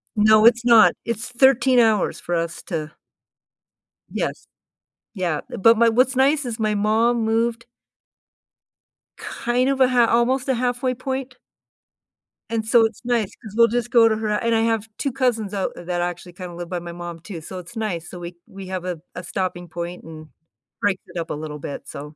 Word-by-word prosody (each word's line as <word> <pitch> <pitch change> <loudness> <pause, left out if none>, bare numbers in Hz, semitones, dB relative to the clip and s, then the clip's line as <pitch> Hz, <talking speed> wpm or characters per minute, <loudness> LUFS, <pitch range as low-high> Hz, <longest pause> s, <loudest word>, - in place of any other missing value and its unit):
No, 215 +1 +5
it's 235 0 +5
not, 235 -2 +7
it's 230 +1 -3
13 260 0 +4
hours 220 -4 +2
for 175 - -3
us 165 0 -3
to 155 -4 -4 1.2
Yes. - - -3 0.7
Yeah, 175 -7 -2
but 230 +3 +4
my 230 0 +5
what's 255 +4 +2
nice 275 +2 +3
is 230 -1 -5
my 215 -1 +1
mom 225 +3 +2
moved 230 +1 0 1.5
kind 250 +2 -1
of 270 -1 0
a 255 - +6
ha 245 -2 +4
almost 250 +3 +2
a 260 - +3
halfway 250 +1 -1
point. 260 0 -4 1.1
And 225 -1 -2
so 225 0 +5
it's 220 -2 -5
nice 235 -5 0
'cause 215 -4 -10
we'll 230 0 +7
just 240 +1 -2
go 230 -2 +6
to 220 - +1
her 220 -1 -3
and 230 +2 0
I 225 - +2
have 225 -1 0
2 275 - -2
cousins 235 -6 -1
out 195 -2 -1
that 175 0 -3
actually 175 0 -4
kinda 180 -1 -8
live 175 -1 -7
by 180 -1 -3
my 170 0 -8
mom 175 -1 -7
too, 165 -1 -8
so 185 +4 -8
it's 180 +7 -12
nice, 185 -7 -3
so 180 - -9
we 175 0 -8
we 195 -1 -10
have 185 -1 -4
a 175 -3 -4
a 180 - -6
stopping 175 -1 -3
point 170 +2 -6
and 155 -1 -11 0.5
breaks 205 -2 +1
it - - -10
up 165 - -5
a - - -2
little 150 0 -6
bit, 140 - -7
so 150 +1 -9
220 Hz, 190 wpm, -22 LUFS, 175-240 Hz, 1.5 s, not